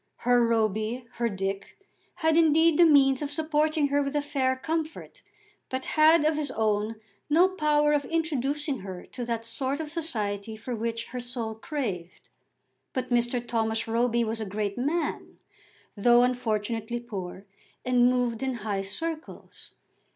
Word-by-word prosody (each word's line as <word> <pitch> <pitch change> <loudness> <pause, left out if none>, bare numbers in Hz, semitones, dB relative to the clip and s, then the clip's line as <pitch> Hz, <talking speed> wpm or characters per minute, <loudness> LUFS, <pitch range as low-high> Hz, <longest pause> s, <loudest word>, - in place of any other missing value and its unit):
Her 245 -1 +4
Roby, 225 +1 0
her 235 0 +1
Dick, 195 -1 -4 0.4
had 320 -2 +2
indeed 320 0 +4
the 345 - +8
means 270 -3 +5
of 290 - -2
supporting 310 0 +1
her 285 +1 +2
with 280 +1 -3
a 295 - +2
fair 270 -3 0
comfort, 320 - -4 0.5
but 260 0 -3
had, 310 0 +5
of 310 0 +2
his 300 -2 -2
own, 215 -2 0 0.3
no 335 +5 +5
power 300 -4 +2
of 290 -1 +1
introducing 295 -3 -1
her 185 -2 -8
to 245 - -7
that 230 -1 -3
sort 265 +4 -2
of 310 -2 -4
society 220 - -3
for 235 +3 -5
which 230 +1 -3
her 250 - -5
soul 240 -2 -3
craved. 220 - -5 0.6
But 255 -1 -3
Mr. 240 0 +1
Thomas 225 -1 0
Roby 235 +1 +1
was 225 0 -2
a - - -2
great 205 0 -2
man, 300 +7 -2 0.6
though 240 +3 +5
unfortunately 230 -1 -1
poor, 195 -5 -7 0.4
and 250 -1 +4
moved 245 -2 0
in 265 -1 -1
high 200 -2 -1
circles. 320 - -6
245 Hz, 150 wpm, -27 LUFS, 225-295 Hz, 0.6 s, the